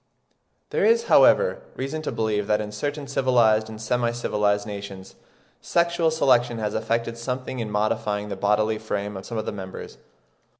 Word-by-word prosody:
There - - 0
is, 460 +1 +4
however, - - +5
reason 135 +4 -4
to 155 - -3
believe 105 -2 -1
that 105 0 +2
in 105 -1 -4
certain 145 +7 -4
civilised 120 -5 +2
and 110 -1 -9
semi 120 +2 0
civilised 105 -3 0
nations 100 -2 -8 0.5
sexual 170 -1 +1
selection 125 -6 +2
has 105 -1 -2
effected 115 +1 -2
something 130 +1 -4
in 110 -2 -3
modifying 105 0 -1
the 100 - -3
bodily 105 +2 +1
frame 105 -1 -4
of 95 - -8
some 115 - -5
of 110 - -2
the - - -2
members. 95 -2 -8
110 Hz, 165 wpm, -24 LUFS, 105-125 Hz, 0.5 s, however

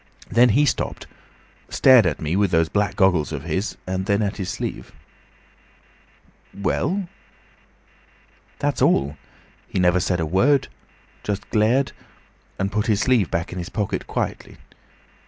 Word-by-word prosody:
Then 120 +2 +5
he 145 +7 +4
stopped. - - -2 0.6
Stared 125 -7 +6
at 75 - -2
me 80 +2 -2
with 100 0 +2
those 80 -2 +2
black 105 -1 0
goggles 90 -6 +2
of 75 -3 -5
his, 95 +6 -3
and 95 +1 -3
then 100 +1 +2
at 100 - -2
his 95 -3 -4
sleeve." - - -5 1.6
"Well?" 180 - -1 1.5
"That's - - -1
all. 70 +2 +2 0.5
He - - -5
never 90 0 +3
said 90 0 0
a 80 - 0
word; 125 - +2 0.5
just 105 -1 -4
glared, 115 +6 +2 0.7
and 95 +1 -1
put 105 0 -1
his 105 -2 +2
sleeve 115 -8 +2
back 85 +1 -2
in 90 - -5
his 85 - -5
pocket 105 -3 -3
quickly. - - -4
100 Hz, 140 wpm, -22 LUFS, 90-110 Hz, 1.6 s, Stared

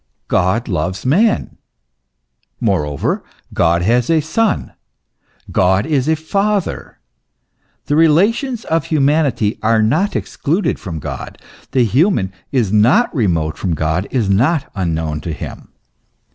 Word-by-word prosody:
God 95 +7 +1
loves 90 +1 -2
man; 200 - +1 1.0
moreover 75 - -1 0.3
God 85 +1 +2
has 120 +4 +2
a 165 -1 +4
Son; 200 +7 -1 0.8
God 95 +2 +2
is 145 -2 0
a 160 - +3
father; 195 +5 -2 0.9
the 145 - 0
relations 210 - +2
of 165 -1 0
humanity 145 - +1
are 110 0 +3
not 160 - +1
excluded 170 +8 -1
from 85 -5 -6
God; 75 - -7 0.3
the 130 - +2
human 115 - +1 0.2
is 115 -7 0
not 120 - +4
remote 85 - 0
from 90 -4 -1
God, 80 +5 -1
not 125 - +1
unknown 80 -5 -2
to 80 - -4
him. - - -8
120 Hz, 120 wpm, -17 LUFS, -, 1.0 s, a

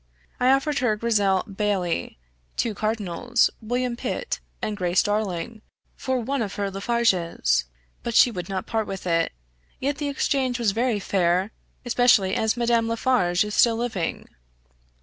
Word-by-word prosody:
I 250 - +3
offered 275 +2 +2
her 245 -5 +2
Grizzel 205 -4 +2
Baillie, 195 - -2 0.4
two 230 - 0
Cardinals, 215 +2 0
William 245 +2 -1
Pitt, 485 - -3 0.2
and 215 - -3
Grace 180 -2 +2
Darling, 210 +1 -2 0.3
for 260 -1 -1
one 270 +3 -2
of 205 -3 -3
her 200 -1 -2
Laffarges; 195 -4 +1 0.4
but 235 -2 -4
she 245 - +7
would 180 -4 -6
not 190 -1 -3
part 220 -2 -1
with 195 -1 -6
it. 165 -2 +1 0.5
Yet 280 +2 -2
the 290 -1 -1
exchange 270 -3 0
was 230 -4 +1
very 230 0 0
fair, 185 +1 +1 0.3
especially 245 -5 +4
as 220 +2 +1
Madame 235 -1 +2
Laffarge 230 -6 +2
is 210 - -5
still 235 0 +4
living." 225 -8 -3
220 Hz, 150 wpm, -24 LUFS, 195-245 Hz, 0.5 s, she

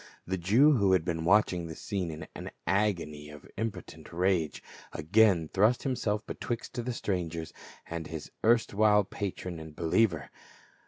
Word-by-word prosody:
The 95 - -1
Jew 115 - +5
who 100 -3 +3
had 90 -3 +2
been 80 -2 -2
watching 90 -3 +3
the 80 - -7
scene 95 -5 -3
in 80 0 -7
an - - -7 0.2
agony 85 -7 0
of 75 -1 -12
impotent 110 0 -6
rage, 85 -3 0 0.3
again 90 +1 +3
thrust 105 +9 +2
himself 110 -6 -1
betwixt 120 0 -4
the 125 - -2
strangers 85 -7 -3 0.3
and 85 -1 -5
his 80 -2 -7
erstwhile 110 -2 +4
patron 95 -3 -5
and 80 -1 -10
believer. 85 - +1
95 Hz, 145 wpm, -29 LUFS, 80-105 Hz, 0.3 s, Jew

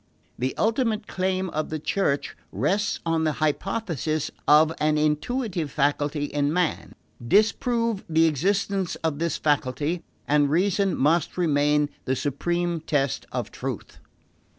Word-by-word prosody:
The 130 +1 -2
ultimate 225 -1 +1
claim 185 -1 -1
of 155 0 -2
the 155 - -2
Church 150 -2 -1 0.2
rests 185 - 0
on 165 -1 +1
the 155 -1 +1
hypothesis 155 - -1 0.2
of 155 +2 +6
an 155 0 +2
intuitive 160 - -1
faculty 145 +1 0
in 145 0 0
man. 175 0 -1 0.3
Disprove 225 - +2
the 160 0 +4
existence 190 +4 0
of 155 -3 -1
this 170 0 -1
faculty, 145 +3 0 0.2
and 145 -1 +3
reason 190 +4 +1
must 155 +5 +1
remain 150 -3 +2 0.2
the 130 - 0
supreme 170 +5 -1
test 140 -4 -1
of - - -3
truth. - - -6
160 Hz, 130 wpm, -25 LUFS, 145-190 Hz, 0.3 s, of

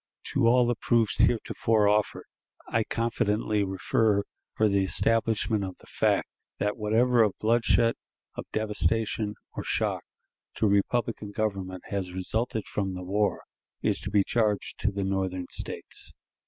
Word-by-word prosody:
To 115 - +3
all 125 +1 +5
the 120 - +2
proofs 115 -2 +1
heretofore 110 -2 +2
offered 105 0 +1 0.4
I 115 - +1
confidently 110 -2 0
refer 100 +2 +1 0.3
for 110 - +3
the 100 -1 +2
establishment 110 +1 +1
of 95 -1 -6
the - - -19
fact - - +1 0.3
that 105 0 -1
whatever 115 +3 +3
of 105 -3 +2
bloodshed, 115 +1 +3 0.4
of - - -7
devastation, 110 0 0 0.2
or - - -5
shock - - -1 0.5
to - - +1
republican 105 +2 +1
government 95 -4 -3
has 95 -3 -3
resulted 110 +4 -2
from 95 -2 -3
the 90 - -6
war, 100 +3 0 0.4
is - - +2
to 100 - -5
be 100 0 +3
charged 105 -3 0
to 105 - +1
the 100 0 -3
Northern 95 -1 -1
States. - - -3
105 Hz, 140 wpm, -27 LUFS, 100-115 Hz, 0.5 s, all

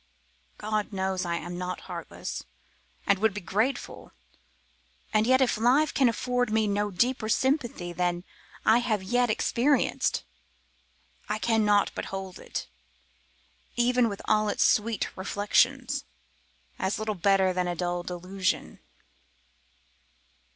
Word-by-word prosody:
God 215 0 -2
knows 190 -1 -1
I 170 -1 -1
am 175 +1 -5
not 180 0 -4
heartless, - - -6 0.6
and 200 -1 +3
would 220 -1 +2
be - - -2
grateful; 215 +9 -2 1.0
and 215 +1 +3
yet 260 +1 +5
if 245 -4 +2
life 270 +6 +3
can 265 -3 +4
afford 245 +1 0
me 220 0 +2
no 205 0 0
deeper 225 +3 0
sympathy 240 - 0
than 175 0 -1 0.4
I 225 +2 +6
have 220 -5 -1
yet 245 +4 +2
experienced, 245 +5 +1 1.1
I - - 0
cannot 215 -2 +3
but - - -4
hold 190 -1 -6
it, - - -5 1.1
even 245 0 +3
with 200 - -7
all 215 0 +2
its - - +2
sweet 220 0 +1
reflections, 250 +8 +1 0.8
as 190 +2 0
little 215 0 -2
better 190 0 +3
than 180 0 0
a 175 - -2
dull 175 0 -1
delusion. 185 +2 -3
210 Hz, 125 wpm, -27 LUFS, 190-240 Hz, 1.1 s, I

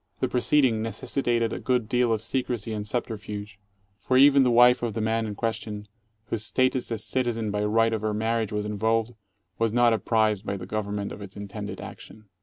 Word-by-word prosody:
The - - +1
proceeding 125 -2 +2
necessitated 120 0 -1
a - - -4
good 125 -4 0
deal 125 0 +2
of 110 -1 0
secrecy 120 -2 -2
and 105 -1 -4
subterfuge, 105 -3 -4 0.4
for 130 - +1
even 140 +1 +7
the 130 - +4
wife 125 +1 +6
of 115 -3 -2
the - - -1
man 110 +1 0
in 105 - -5
question, 105 -1 -4 0.4
whose 110 -3 -3
status 130 +1 0
as 110 -2 -2
citizen 115 -4 -1
by 105 0 -1
right 115 +2 +2
of 110 - -2
her 110 0 -1
marriage 110 0 -1
was 105 0 -2
involved, 110 +3 0 0.5
was 115 -1 +2
not 120 0 +4
apprised 110 -2 +1
by 100 -2 -3
the - - -7
Government 105 -1 -3
of - - -8
its 100 -1 -10
intended 100 -1 -6
action. 110 -2 -11
110 Hz, 195 wpm, -26 LUFS, 105-120 Hz, 0.5 s, even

